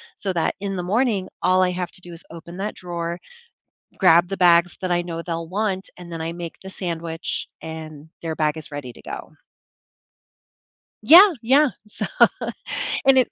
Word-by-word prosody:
so 195 - -2
that 165 -2 0
in 200 -1 -3
the 180 - -2
morning, 205 0 +1 0.2
all 185 +1 +4
I 180 - +2
have 180 -1 -3
to - - -12
do 175 -1 -11
is 165 - -8
open 170 +1 -10
that 205 +2 -3
drawer, 170 -1 -4 0.8
grab 175 -2 +6
the 195 - -3
bags 175 -1 +4
that 185 -1 -2
I 175 0 +2
know 165 -1 -5
they'll 165 -1 -4
want, 195 -1 -2
and 175 -1 -10
then 165 -1 -5
I 165 +1 -3
make 170 -1 -7
the 190 - -8
sandwich, 165 -3 -3
and 160 -2 -8
their 160 -1 -3
bag 155 -1 +1
is 155 -1 -7
ready 140 -4 -6
to - - -15
go. - - -8 1.7
Yeah, 350 - +10
yeah, 275 +6 +5 0.2
so 210 - -4 1.0
and 270 -1 +7
it 255 - +3
175 Hz, 180 wpm, -22 LUFS, 165-190 Hz, 1.7 s, Yeah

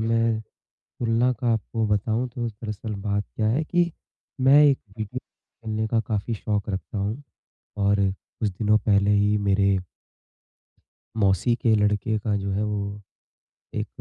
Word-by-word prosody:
मैं 115 0 +1 0.6
तुलना 120 +2 +2
का 120 0 0
आपको 110 0 -1
बताऊँ 110 +4 0
तो 120 -1 -3
दरअसल 105 0 -6
बात 100 0 0
क्या 110 -1 +1
है 140 +8 +1
कि 175 +2 +1 0.5
मैं 135 +3 +7
1 140 -2 +5 0.2
वीडियो 110 +3 -4
गेम 115 -2 -16
खेलने 110 0 0
का 115 0 +2
काफ़ी 110 +2 -1
शौक 105 -1 -2
रखता 100 +1 -4
हूँ, 105 +8 -2 0.6
और 100 0 +3 0.2
कुछ 105 +2 -5
दिनों 105 +3 +2
पहले 100 -1 +3
ही 105 0 +3
मेरे 100 -1 +2 1.4
मौसी 100 +3 +3
के 115 -2 +2
लड़के 105 +1 +1
का 105 0 -1
जो 100 0 -2
है 100 +2 0
वो 105 -1 -3 0.8
एक - - -2
110 Hz, 150 wpm, -25 LUFS, 100-115 Hz, 1.4 s, मैं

